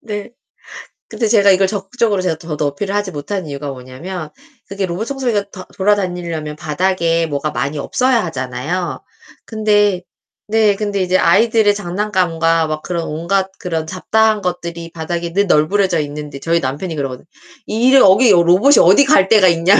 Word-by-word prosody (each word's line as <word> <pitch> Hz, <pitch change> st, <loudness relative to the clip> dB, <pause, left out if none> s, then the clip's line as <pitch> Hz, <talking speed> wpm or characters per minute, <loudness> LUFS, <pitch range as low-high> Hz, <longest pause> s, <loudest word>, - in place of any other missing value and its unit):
네. 205 Hz, -2 st, -6 dB, 0.8 s
근데 230 Hz, -, -2 dB
제가 205 Hz, -2 st, +4 dB
이걸 190 Hz, 0 st, +3 dB
적극적으로 205 Hz, +1 st, -1 dB
제가 180 Hz, -3 st, -1 dB
더, 160 Hz, -2 st, -7 dB
더 150 Hz, -, 0 dB
어필을 190 Hz, +8 st, -4 dB
하지 205 Hz, -2 st, -2 dB
못한 180 Hz, +5 st, -5 dB
이유가 140 Hz, 0 st, -5 dB
뭐냐면 150 Hz, +7 st, -8 dB, 0.4 s
그게 195 Hz, 0 st, -3 dB
로봇 185 Hz, +5 st, -4 dB
청소기가 245 Hz, -7 st, -1 dB
더 185 Hz, -, -9 dB
돌아다니려면 175 Hz, -6 st, -2 dB
바닥에 165 Hz, +1 st, 0 dB
뭐가 145 Hz, 0 st, -3 dB
많이 140 Hz, +2 st, -3 dB
없어야 245 Hz, -, 0 dB
하잖아요. 145 Hz, +4 st, -4 dB, 0.5 s
근데. 205 Hz, -4 st, +1 dB, 0.7 s
근데 205 Hz, -2 st, -2 dB
이제 185 Hz, 0 st, +1 dB
아이들의 210 Hz, +4 st, +3 dB
장난감과 175 Hz, -4 st, 0 dB
막 155 Hz, 0 st, -4 dB
그런 170 Hz, -2 st, -3 dB
온갖 190 Hz, +5 st, -1 dB
그런 165 Hz, -3 st, -3 dB
잡다한 215 Hz, +5 st, +1 dB
것들이 170 Hz, -2 st, -5 dB
바닥에 170 Hz, +1 st, -4 dB
늘 200 Hz, +2 st, +2 dB
널브러져 180 Hz, +2 st, +2 dB
있는데 145 Hz, -1 st, -6 dB
저희 165 Hz, +4 st, 0 dB
남편이 145 Hz, +6 st, -4 dB
그러거든요. 135 Hz, -3 st, -5 dB, 0.4 s
이래 245 Hz, +5 st, +3 dB
여기 205 Hz, +3 st, +6 dB
여 175 Hz, -, +5 dB
로봇이 185 Hz, +12 st, +4 dB
어디 190 Hz, +10 st, +6 dB
갈 195 Hz, -7 st, +4 dB
데가 205 Hz, -3 st, +5 dB
있냐며. 170 Hz, +4 st, +3 dB
180 Hz, 370 characters per minute, -17 LUFS, 160-205 Hz, 0.8 s, 여기